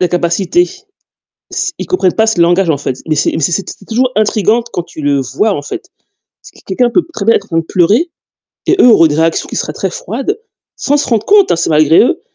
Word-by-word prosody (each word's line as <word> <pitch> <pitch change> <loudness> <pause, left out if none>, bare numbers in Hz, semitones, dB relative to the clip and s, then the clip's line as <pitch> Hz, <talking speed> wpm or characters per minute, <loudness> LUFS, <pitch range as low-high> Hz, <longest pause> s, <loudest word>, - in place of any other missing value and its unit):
L'incapacité. 180 - +1 0.8
S 370 0 -2
ils - - -5
comprennent 190 - +1
pas 220 - +2
ce 220 -6 0
langage 175 +1 +3
en 150 - +1
fait. 130 -2 -4
Mais 155 - +1
c'est 150 - +1
mais 160 - -2
c'est 175 +6 0
t - - -8
c'est 195 - -18
toujours 250 +3 0
intrigant 215 +2 +2
quand 175 - -2
tu 170 -2 -11
le 145 -1 +1
vois, 205 - -1
en 145 - -4
fait. - - -7 0.5
C'est - - -15
q - - -20
quelqu'un 240 +6 +1
peut 345 - +1
très 200 - -4
bien 230 - +4
être 200 - -3
en - - -29
train 165 - 0
de 165 - -1
pleurer 205 - +1 0.6
et - - +3
eux 250 - +7
auraient 165 -7 +6
des 145 - -1
réactions 165 +1 0
qui - - -7
seraient - - -3
très - - -3
froides, - - -4 0.4
sans 290 +1 0
se 290 - -1
rendre 225 -2 0
compte 405 -2 +4
hein, - - +3
c'est 165 - -1
malgré 155 0 +4
eux, 240 - +1
195 Hz, 250 wpm, -13 LUFS, 165-240 Hz, 0.8 s, eux